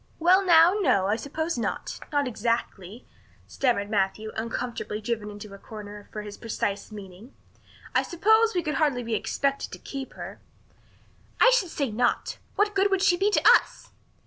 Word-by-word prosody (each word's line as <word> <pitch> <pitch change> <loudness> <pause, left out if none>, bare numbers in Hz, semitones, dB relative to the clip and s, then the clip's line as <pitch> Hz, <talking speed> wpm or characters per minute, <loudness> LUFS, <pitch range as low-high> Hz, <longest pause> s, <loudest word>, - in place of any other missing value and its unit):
"Well, 365 +4 +4
now, 340 0 +6
no, 250 - +3
I 205 +2 +1
suppose 295 +4 -3
not - - -3
not 285 -2 +1
exactly," 225 -3 -3 0.4
stammered 235 -6 0
Matthew, 210 +1 -1
uncomfortably 230 -1 -4
driven 215 -1 -3
into 205 0 -10
a 200 - -11
corner 210 -1 -10
for 210 - -6
his 205 -1 -9
precise 205 -2 -3
meaning. 205 +4 -11 0.6
"I - - +4
suppose 440 +5 +3
we 350 - +1
could 305 - -2
hardly 270 -5 +1
be 230 -1 -4
expected 275 +5 -1
to - - -6
keep 270 -2 -7
her." - - -9 1.0
"I - - +7
should 390 -8 0
say 280 -7 -2
not. 240 +3 0 0.2
What 415 0 +2
good 395 0 +2
would 390 -1 +1
she 385 -3 +5
be 390 +4 +2
to 420 - +2
us?" - - +3
245 Hz, 170 wpm, -26 LUFS, 210-335 Hz, 1.0 s, I